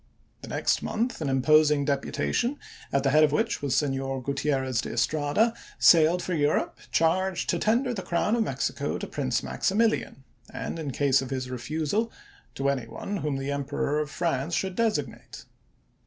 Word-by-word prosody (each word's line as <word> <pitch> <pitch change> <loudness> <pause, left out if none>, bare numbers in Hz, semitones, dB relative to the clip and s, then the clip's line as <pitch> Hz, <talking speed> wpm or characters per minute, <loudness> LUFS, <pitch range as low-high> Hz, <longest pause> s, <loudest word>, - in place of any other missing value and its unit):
The - - -9
next - - 0
month 235 -3 -2
an 145 - -1
imposing 150 +2 +4
deputa 140 -1 -1
tion, 250 +4 0 0.3
at 140 -1 +1
the 135 - +2
head 155 +2 +6
of 150 - +4
which 225 +9 0
was 140 -3 0
Senor 135 -2 -1
Gutierrez 135 -2 0
de - - -6
Estrada, 150 - +1 0.2
sailed 170 +1 +5
for 185 - -2
Europe 150 -2 0
charged 180 +3 +1
to 175 - -1
tender 245 +6 +1
the 200 - -4
crown 180 +6 0
of 235 - +1
Mexico 220 - -2
to - - -5
Prince - - -2
Maximilian, 220 -9 0 0.3
and, 165 - -5
in 155 -3 -4
case 135 0 +2
of 135 - -6
his 130 -1 -4
refusal, 155 - -2 0.4
to 140 - -1
any 130 -4 -2
one 200 - -5
whom 150 -5 -2
the 135 +1 -3
Emperor 140 +1 -1
of 150 -1 -2
France 165 -1 -1
should 190 -1 -2
designate. 225 -1 -2
150 Hz, 170 wpm, -27 LUFS, 135-185 Hz, 0.4 s, head